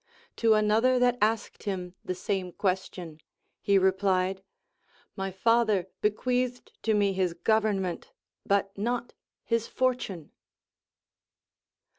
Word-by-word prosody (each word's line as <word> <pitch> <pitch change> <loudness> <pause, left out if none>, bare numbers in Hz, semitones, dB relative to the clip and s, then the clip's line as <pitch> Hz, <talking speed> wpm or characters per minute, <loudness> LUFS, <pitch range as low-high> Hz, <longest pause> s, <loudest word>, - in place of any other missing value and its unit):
To 225 -2 +4
another 220 +4 +3
that 245 0 +2
ask°d 215 +1 0
him 180 -3 -3
the 185 - -3
same 185 -1 -3
question, 180 -4 -3 0.4
he 200 -1 +3
replied: 190 0 +2 0.7
My 195 -1 -3
father 210 -1 +2
bequeathed 245 +3 -1
to 220 -1 +1
me 200 -1 +2
his 185 -3 0
government, 200 -2 0 0.3
but 200 0 0
not 240 +4 -2 0.3
his 230 -1 0
fortune. 245 - -2
200 Hz, 105 wpm, -28 LUFS, 190-230 Hz, 0.7 s, To